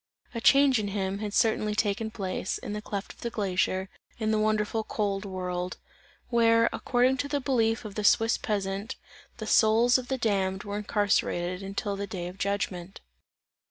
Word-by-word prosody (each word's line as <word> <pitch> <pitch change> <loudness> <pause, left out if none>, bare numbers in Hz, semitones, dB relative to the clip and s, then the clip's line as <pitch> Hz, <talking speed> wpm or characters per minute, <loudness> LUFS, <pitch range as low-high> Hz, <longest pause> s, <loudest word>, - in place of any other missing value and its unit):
A 230 - -4
change 275 -1 +5
in 205 - -2
him, 195 -1 -2
had 210 -1 -3
certainly 215 -1 +1
taken 215 +1 0
place, 190 -3 -3
in 205 - -6
the 210 - -4
cleft 200 -1 -5
of - - -26
the 235 - -2
glacier, 190 -3 0 0.3
in 220 -1 0
the 215 - +2
wonderful 215 +1 +1
cold 205 -2 -2
world; 180 -1 -4 0.5
where, 230 -1 +4
according 255 +1 +2
to 285 - -2
the 285 0 -1
belief 230 -4 +1
of 210 - -6
the 210 - -3
Swiss 225 +2 +4
peasant, 200 0 -2 0.4
the - - -5
souls 235 +3 +4
of 250 - -8
the 265 - -1
damned 195 -4 0
are 205 0 -4
incarcerated 200 -3 0
until 200 +1 -3
the 200 0 -4
day 180 -2 -5
of 180 +2 -10
judgment. 195 -2 -3
210 Hz, 175 wpm, -28 LUFS, 195-225 Hz, 0.5 s, change